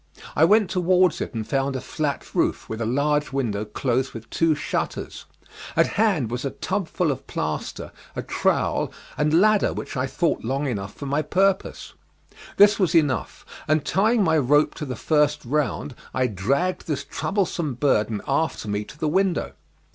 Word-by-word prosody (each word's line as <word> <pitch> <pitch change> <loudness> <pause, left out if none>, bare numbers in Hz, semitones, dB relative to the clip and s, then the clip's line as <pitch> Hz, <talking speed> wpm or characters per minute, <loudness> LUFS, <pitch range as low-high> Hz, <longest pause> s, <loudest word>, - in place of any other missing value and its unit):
I 155 - +6
went 210 +1 +4
towards 180 -1 +3
it - - -4
and 110 -1 -3
found 135 0 0
a - - -1
flat 140 +2 -3
roof, - - 0
with 110 +1 -5
a 110 - -1
large 145 +4 +1
window 110 -6 -1
closed 125 +4 -1
with 115 0 -8
two 165 -2 +2
shutters. 150 - -4 0.5
At - - +5
hand 185 - +1
was 125 +1 -3
a 140 - -1
tubful 175 0 -1
of 135 - -6
plaster, - - -4 0.2
a - - -3
trowel, - - 0 0.2
and 150 +3 +3
ladder 215 +1 +4
which - - -6
I 130 0 0
thought 165 +5 0
long 135 +5 -1
enough 100 -7 -4
for 140 - -7
my 140 +2 0
purpose. 190 +5 0 0.6
This 205 +1 +6
was 180 -4 +2
enough, 145 -7 +1 0.2
and 155 -1 +2
tying 215 +5 +3
my 160 -3 +3
rope 145 +3 +3
to 150 - -3
the 125 - -4
first 150 -2 +1
round 145 +1 -1 0.2
I 130 - +2
dragged 135 - -1
this 145 -3 -2
troublesome 170 - -2
burden 115 -5 +1
after 140 -4 0
me 105 0 -1
to 145 - -13
the 155 - -1
window. 185 +2 +1
150 Hz, 170 wpm, -24 LUFS, 130-170 Hz, 0.6 s, I